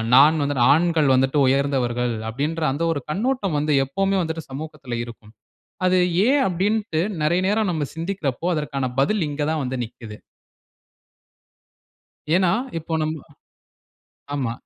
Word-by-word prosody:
நான் 150 +3 +6
வந்துட்டு 140 -4 +1
"ஆண்கள் 165 -2 +2
வந்துட்டு 135 +3 +2
உயர்ந்தவர்கள்" 125 -3 +1 0.2
அப்படீன்ற 150 +7 -2
அந்த 150 +5 -2
ஒரு 145 - -1
கண்ணோட்டம் 205 - -1
வந்து 150 +1 0
எப்பவுமே 195 +8 0
வந்துட்டு 160 -1 -3
சமூகத்துல 145 -3 -6
இருக்கும். 110 -2 -13 0.5
அது 185 0 +4 0.3
ஏன் 275 +1 +4
அப்படீன்ட்டு 195 -1 0 0.2
நெறைய 170 +4 +2
நேரம் 210 -2 +1
நம்ம 155 -3 -1
சிந்திக்குறப்போ, 165 -4 -3
அதற்கான 140 -3 -2 0.2
பதில் 190 +8 +1
இங்க 145 +1 -3
தான் 155 -2 -1
வந்து 130 +1 -3
நிக்குது. 110 -1 -10 2.2
ஏன்னா, 185 -2 +3 0.3
இப்போ 165 +1 -6
நம்ம 155 0 -3 1.2
ஆமா. 125 -5 -1
155 Hz, 125 wpm, -22 LUFS, 135-175 Hz, 2.2 s, நான்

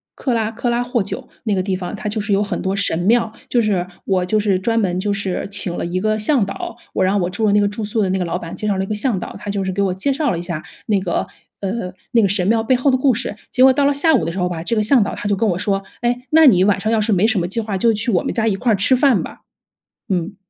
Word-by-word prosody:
克 255 - -2
拉 220 -1 0
克 235 +2 -2
拉 240 +1 +1
霍 245 -3 -1
久 195 - -7 0.2
那 215 - 0
个 185 - +1
地 190 0 -1
方。 185 +2 -5
它 210 - -5
就 210 0 -2
是 210 0 -4
有 195 - +3
很 205 -3 -3
多 190 0 -1
神 200 -4 +1
庙， 225 +4 +2 0.2
就 240 - +2
是 195 -5 0 0.2
我 185 -2 +1
就 215 +4 +1
是 205 -3 +1
专 230 +4 0
门 185 -4 0
就 205 +1 -1
是 200 -2 -2
请 200 -3 -1
了 - - -3
一 180 +2 -2
个 215 +2 0
向 220 0 +3
导， 195 - -6 0.2
我 - - +1
让 195 +2 +2
我 175 - -1
住 220 +4 -1
的 205 - +3
那 205 - +4
个 205 - +2
住 205 +2 -4
宿 215 +2 -1
的 190 - +1
那 190 - 0
个 - - 0
老 175 +1 -2
板 165 -2 -7
介 - - -5
绍 195 - 0
了 190 - 0
一 - - -12
个 215 - -2
向 210 -3 0
导， - - -7
他 205 - -5
就 200 -1 -2
是 190 - -1
给 200 - -1
我 190 -2 +1
介 235 +9 0
绍 290 +2 0
了 170 - -2
一 - - -4
下， 170 -3 -5 0.2
那 210 -2 +2
个， 180 -2 -2 0.3
呃， 190 -2 -4 0.2
那 235 -2 +4
个 200 - +2
神 190 -1 +1
庙 225 0 +2
背 255 +3 +2
后 255 +3 +2
的 260 - +3
故 260 0 +3
事。 235 -2 -3 0.2
结 255 - 0
果 265 0 +7
到 285 - +1
了 285 0 +3
下 320 +3 +4
午 230 - +1
的 165 - -2
时 190 - -5
候 180 - +1
吧， 165 -2 -5
这 230 +6 -1
个 215 - +3
向 235 +2 +4
导 200 - -4
他 - - -5
就 205 - +1
跟 225 +2 0
我 175 0 -1
说： 195 -1 -1 0.2
“诶， 245 +1 0
那 320 0 +6
你 185 -9 +6
晚 200 0 +2
上 215 - -2
要 225 -1 +2
是 215 +1 0
没 195 +2 +3
什 220 -3 +1
么 175 - 0
计 230 - -2
划 210 -3 -3
就 225 +4 +3
去 225 +3 0
我 180 - +1
们 - - -2
家 225 -1 0
一 200 - +1
块 235 +3 0
儿 - - +4
吃 205 +7 +4
饭 270 0 +3
吧！” - - -9 0.7
嗯。 180 +3 -2
205 Hz, 350 characters per minute, -19 LUFS, 190-230 Hz, 0.7 s, 果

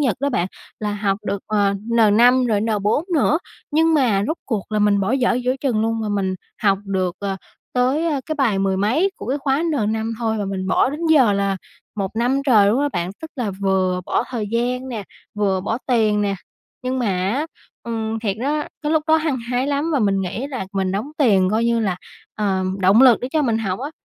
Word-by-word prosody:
Nhật 260 -7 +1
đó 280 - +1
bạn. 180 -9 0 0.3
Là 210 -1 -2
học 200 -1 -1
được, 200 +1 -1
ờ, 205 -2 +2 0.2
N5 235 +3 +5
rồi 210 -3 +1
N4 215 +5 0
nữa, 305 +1 +3 0.3
nhưng 320 +2 +3
mà 235 -9 +3
rốt 315 - -1
cuộc 215 -4 -3
là 215 - +1
mình 205 -1 +3
bỏ 195 +5 0
dở 255 -3 +2
giữa 250 +1 0
chừng 245 -6 0
luôn, 225 +1 0
mà 215 - -2
mình 195 -2 -1 0.3
học 195 -2 +3
được, 185 -2 -1
ờ, 195 -1 -3 0.4
tới, 260 +6 +1
a, 295 -4 0
cái 310 - -2
bài 250 -9 +1
mười 195 -1 +1
mấy 250 - +2
của - - -8
cái 270 +4 -1
khóa 275 +2 0
N5 225 -8 -1
thôi 225 -2 -1
và 205 - -1
mình 190 -1 -3
bỏ 225 - +3
đến 295 +3 -6
giờ 275 -9 +5
là 200 -1 0 0.4
1 195 -2 -2
năm 250 +4 +1
trời 215 -6 +5
luôn 230 +6 +2
á 290 - +1
bạn. 175 +2 -2
Tức 320 - -7
là 240 -6 -1
vừa 185 -2 +1
bỏ - - 0
thời 230 -5 -3
gian 250 +3 -1
nè, 230 -5 -4 0.3
vừa 195 -3 0
bỏ 220 +4 -2
tiền 220 -4 +2
nè, 200 -1 0 0.5
nhưng 255 +1 -2
mà 245 - 0 0.3
á, 290 +6 -1 0.4
ừm, 225 -1 -3
thiệt 205 -3 -2
đó, 295 +4 0 0.2
cái 300 +1 0
lúc 315 -1 +2
đó 315 - +6
hăng 310 -4 0
hái 250 +2 0
lắm 290 +3 0
và 290 - +2
mình 200 -4 +1
nghĩ 195 +8 -3
là 260 -9 -5
mình 190 -1 -1
đóng 215 +9 -3
tiền 195 -10 +4
coi 220 +2 +1
như 235 0 +2
là, 195 -5 0 0.4
ờ, 195 -3 0 0.2
động 195 +6 +5
lực 250 -4 +6
để 250 - -3
cho 310 - +2
mình 230 -5 +1
học 195 -2 -2
á. 280 +3 -4
225 Hz, 225 wpm, -21 LUFS, 200-265 Hz, 0.5 s, đó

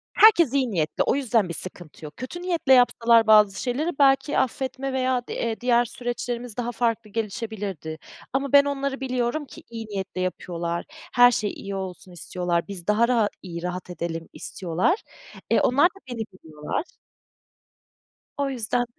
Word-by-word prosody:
Herkes 345 - +7
iyi 260 -4 +1
niyetli, 155 -4 0
o - - +1
yüzden 230 -9 +1
bir - - -3
sıkıntı 170 -2 -7
yok. 150 - -10
Kötü 260 +8 -6
niyetle 340 -7 +2
yapsalar 235 -2 +5
bazı 210 -2 +6
şeyleri 265 +6 -1
belki 270 +1 +4
affetme 265 +1 -2
veya 255 -1 0
d 230 -1 -2
diğer 240 -1 +3
süreçlerimiz 245 -1 -4
daha 240 0 -2
farklı 230 -2 -1
gelişebilirdi. 205 - -4 0.4
Ama 275 0 -1
ben 285 0 +8
onları 275 -1 -2
biliyorum 255 +3 -1
ki - - -13
iyi 225 -1 -6
niyetle 195 -3 -4
yapıyorlar, 170 -2 -3 0.3
her 245 0 +7
şey 210 -3 -1
iyi 200 0 -6
olsun 190 0 -6
istiyorlar, 175 0 -2
biz 190 -3 -8
daha 220 +3 +4
raha 230 -4 +2
iyi 170 -2 -7
rahat 180 0 -4
edelim 165 -1 -5
istiyorlar. 185 - -1 0.5
E, - - +4
onlar 280 +6 +4
da 390 +2 -15
beni 245 - -6 0.2
biliyorlar. 155 - -5 1.5
O 280 -1 0
yüzden 245 -1 -1
230 Hz, 155 wpm, -25 LUFS, 185-260 Hz, 1.5 s, ben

